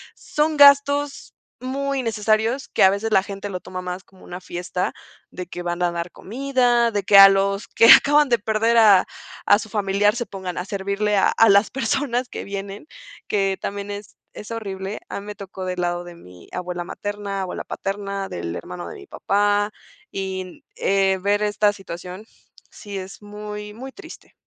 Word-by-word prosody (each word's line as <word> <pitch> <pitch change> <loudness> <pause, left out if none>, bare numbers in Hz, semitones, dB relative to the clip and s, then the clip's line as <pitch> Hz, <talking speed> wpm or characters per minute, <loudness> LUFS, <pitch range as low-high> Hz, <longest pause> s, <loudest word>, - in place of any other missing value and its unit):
son 300 +1 -1
gastos 285 0 +4 0.3
muy 275 +1 -2
innecesarios, 225 +2 0
que - - +2
a 190 - +8
veces 200 +3 -2
la 190 - +5
gente 200 +1 -7
lo 180 -2 -4
toma 185 0 -7
más 180 +1 -6
como 190 -1 -21
una 180 - -8
fiesta, 180 0 -4 0.4
de 180 - -7
que 175 0 -8
van 175 0 -3
a 175 - +2
dar 170 0 -4
comida, 245 0 +1
de 205 -2 -1
que 200 +1 +5
a 195 0 +12
los 195 +2 +1
que 230 - +4
acaban 295 0 +6
de 235 -1 +3
perder 220 +2 +1
a 205 -4 +6 0.4
a 205 - +5
su 220 - -7
familiar 205 0 +1
se 240 - -3
pongan 190 -4 -7
a 180 - -2
servirle 200 +1 -1
a 195 - +4
a 225 -1 +4
las 200 +2 +5
personas 250 0 -1
que - - -7
vienen, 200 +6 -7 0.4
que 195 -2 0
también 200 0 -5
es 205 0 -8 0.2
es 210 - -10
horrible. 195 -3 -5
A - - -4
mí 200 - -11
me 210 - -6
tocó 195 -2 -8
del 180 -1 -3
lado 175 0 -1
de 175 -1 -11
mi 90 - -16
abuela 180 -1 -4
materna, 205 0 -5
abuela 185 - -5
paterna, 195 0 -4
del 85 -1 -5
hermano 180 0 -7
de - - -8
mi 390 -2 -13
papá, 205 - +1 0.4
y 190 -1 -4
n 185 -1 -11 0.2
eh, 195 -1 +2
ver 205 +1 +1
esta 210 0 +2
situación 185 +1 -9 0.5
sí 205 -2 -8
es 190 +2 -8
muy 210 0 -8
muy 260 +5 -9
triste. 395 - -13
200 Hz, 185 wpm, -22 LUFS, 190-225 Hz, 0.5 s, a